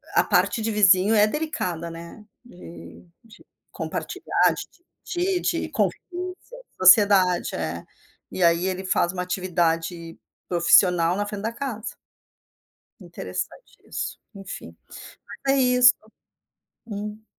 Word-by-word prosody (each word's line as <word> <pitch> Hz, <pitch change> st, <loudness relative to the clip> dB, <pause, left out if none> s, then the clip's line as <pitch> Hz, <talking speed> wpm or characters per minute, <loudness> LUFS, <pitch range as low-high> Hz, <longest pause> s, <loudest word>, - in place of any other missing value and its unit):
a -, -, +5 dB
parte 230 Hz, -, +1 dB
de 220 Hz, 0 st, -2 dB
vizinho 200 Hz, 0 st, +4 dB
é 210 Hz, 0 st, +5 dB
delicada, 185 Hz, -, -3 dB
né, 170 Hz, +6 st, -11 dB, 0.2 s
de 85 Hz, -, -13 dB, 0.2 s
de 225 Hz, -1 st, -18 dB, 0.3 s
compartilhar, -, -, -1 dB
de -, -, -9 dB, 0.3 s
dividir, 360 Hz, +1 st, -1 dB, 0.2 s
de -, -, -5 dB
convivência. 365 Hz, +7 st, -4 dB, 0.2 s
Sociedade, 185 Hz, -1 st, +5 dB
é. 85 Hz, +1 st, -4 dB, 0.5 s
E 185 Hz, -, -2 dB
aí 170 Hz, +2 st, +3 dB
ele 185 Hz, 0 st, -3 dB
faz 175 Hz, -1 st, +1 dB
uma 180 Hz, -, -3 dB
atividade 170 Hz, -2 st, -2 dB, 0.3 s
profissional 170 Hz, 0 st, +4 dB
na 205 Hz, +1 st, -2 dB
frente 205 Hz, 0 st, -6 dB
da 225 Hz, +1 st, -2 dB
casa. 240 Hz, -4 st, -6 dB, 1.0 s
Interessante -, -, -7 dB
isso, -, -, -5 dB, 0.2 s
enfim. 195 Hz, 0 st, -9 dB, 0.7 s
Mas 270 Hz, -, +3 dB
é -, -, +3 dB
isso. 250 Hz, -1 st, +6 dB, 0.9 s
Hum. 210 Hz, +1 st, -7 dB
190 Hz, 115 wpm, -24 LUFS, 170-225 Hz, 1.0 s, isso